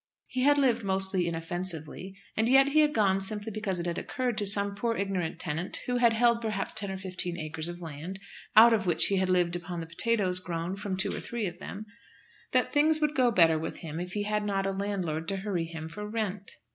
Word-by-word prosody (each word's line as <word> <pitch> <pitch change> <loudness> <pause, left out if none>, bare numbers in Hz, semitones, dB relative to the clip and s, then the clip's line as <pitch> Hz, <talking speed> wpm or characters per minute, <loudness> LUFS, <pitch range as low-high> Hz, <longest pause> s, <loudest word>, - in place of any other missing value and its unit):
He 255 - -3
had 290 +2 +5
lived 245 -5 +2
most 190 0 0
inoffensively, 175 +1 -3 0.2
and 220 +2 +1
yet 270 +1 +6
he 305 +2 +3
had 300 -1 +4
gone 195 -6 +2
simply 210 +2 -3
because 200 -4 -2
it 170 - -3
had 170 -1 -2
occurred 255 -4 -2
to 205 - 0
some 200 0 +2
poor 230 +3 -1
ignorant 190 -4 -2
tenant, 165 +2 -3
who 250 0 0
had 235 -2 +4
held 235 0 +3
perhaps 215 -3 -2
ten 205 -2 -1
or 190 - -4
fifteen 180 -2 -4
acres 155 0 -4
of 175 0 -7
land, 165 +5 -7 0.4
out 230 +2 +9
of 200 -4 0
which 165 -2 +5
he 195 - +2
had 190 0 +1
lived 175 -1 +2
upon 175 0 -5
the 165 - -4
potatoes 185 +1 +1
grown 175 0 -4
from 195 -1 -4
two 190 - +1
or - - -4
three 235 -3 -4
of 175 -1 -5
them, 205 +2 -7 0.7
that - - +2
things 310 +1 +3
would 300 -1 +1
go 255 -3 +3
better 165 -7 +4
with 160 - -6
him 160 -1 -5
if 180 +1 -5
he 205 - -1
had 210 0 -1
not 195 -2 -1
a 195 - 0
landlord 190 -5 -3
to 195 - -1
hurry 190 -4 -2
him 160 -1 -7
for 210 +5 -7
rent! 210 -3 -3
195 Hz, 230 wpm, -29 LUFS, 175-220 Hz, 0.7 s, out